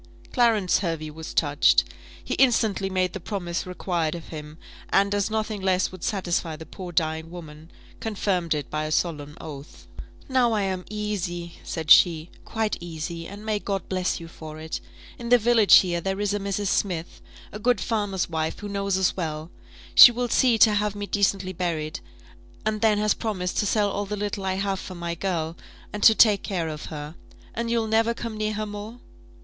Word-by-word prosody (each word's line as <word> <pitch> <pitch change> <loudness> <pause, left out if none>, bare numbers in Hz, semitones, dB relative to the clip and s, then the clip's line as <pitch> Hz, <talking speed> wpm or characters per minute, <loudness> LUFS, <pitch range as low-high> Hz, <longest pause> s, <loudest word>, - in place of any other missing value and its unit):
Clarence 225 -7 +3
Hervey 165 -4 -3
was 160 +1 -8
touched. 145 -1 +4 0.4
He - - -3
instantly 220 -7 +2
made 185 -1 0
the - - -5
promise 180 -2 -4
required 175 -3 -2
of 170 - -9
him; 150 -1 -8 0.3
and, 200 +1 +3
as 205 0 0
nothing 215 -1 -2
less 190 -1 +1
would 185 -2 -11
satisfy 175 -5 -1
the 160 +1 -10
poor 180 0 -8
dying 160 -1 -1
woman, 160 -2 -10 0.3
confirmed 190 -6 -1
it 145 -3 -5
by 155 0 -1
a 155 - -4
solemn 150 -3 -1
oath. 145 -2 -10 0.4
"Now 255 -3 +2
I 210 -2 +1
am 185 -2 -2
easy," 190 -5 -4
said 160 -1 -3
she, 165 -1 +6
"quite 220 -1 -1
easy; 165 0 -6
and 205 +2 -10
may 215 -1 0
God 195 -2 -3
bless 185 -1 -1
you 165 - -9
for 155 -2 -10
it! 160 0 -5 0.4
In 235 -1 -5
the 245 - +7
village 230 -2 +6
here, 175 -2 +4
there 195 +2 -2
is 205 -1 0
a 205 - -1
Mrs. 200 0 -2
Smith, 175 -4 -2 0.3
a 210 - -7
good 245 -1 +2
farmer's 205 -4 -1
wife, 160 -1 -2
who 205 - -7
knows 200 -1 -1
us 190 -1 +1
well; 160 -2 -4 0.4
she 245 - +11
will 245 +1 -2
see 240 0 +4
to 215 0 +6
have 210 0 0
me 205 0 -4
decently 200 -2 0
buried, 165 -4 -3 0.7
and 215 -1 -1
then 220 -2 +4
has 210 0 +2
promised 185 -5 -2
to 205 - +1
sell 205 -1 +2
all 205 0 -3
the 210 +1 -3
little 205 -1 -3
I 190 0 0
have 195 0 -1
for 185 - -8
my 170 -1 -4
girl, 170 -2 -2 0.4
and 210 - -4
to 220 - +7
take 210 -3 +5
care 170 -5 -2
of 150 -1 -6
her. 150 -1 -7 0.4
And 230 +1 -3
you'll 230 -1 +1
never 225 +1 +2
come 230 -2 -5
near 215 0 -1
her 215 +1 -3
more?" 210 +3 -8
190 Hz, 195 wpm, -25 LUFS, 165-210 Hz, 0.7 s, she